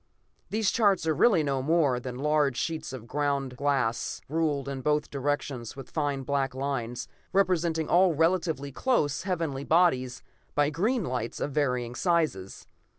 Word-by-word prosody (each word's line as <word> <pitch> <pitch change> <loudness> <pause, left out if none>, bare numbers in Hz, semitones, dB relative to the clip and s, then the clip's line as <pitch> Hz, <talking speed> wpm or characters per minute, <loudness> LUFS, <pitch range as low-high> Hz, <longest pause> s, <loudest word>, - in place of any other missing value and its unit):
These 215 -1 +1
charts 200 -7 +2
are 160 - +2
really 180 -1 +4
no 135 -2 0
more 145 -3 +2
than 125 0 -6
large 145 -2 +1
sheets 160 -1 -3
of 130 -4 -8
ground 140 -1 -1
glass, 135 -4 0
ruled 150 -3 0
in 135 -1 -4
both 150 +1 0
directions 140 -4 -3
with 135 - -10
fine 145 -3 -1
black 135 -1 -1
lines, 130 -3 -3 0.3
representing 170 -4 +2
all 180 -1 +4
relatively 160 -3 +1
close 150 - +1
heavenly 165 -7 -2
bodies 130 -7 +2 0.3
by 145 0 +2
green 215 - 0
lights 125 -5 -3
of 145 - -2
varying 125 -4 0
sizes. 155 - -1
145 Hz, 150 wpm, -28 LUFS, 130-165 Hz, 0.3 s, really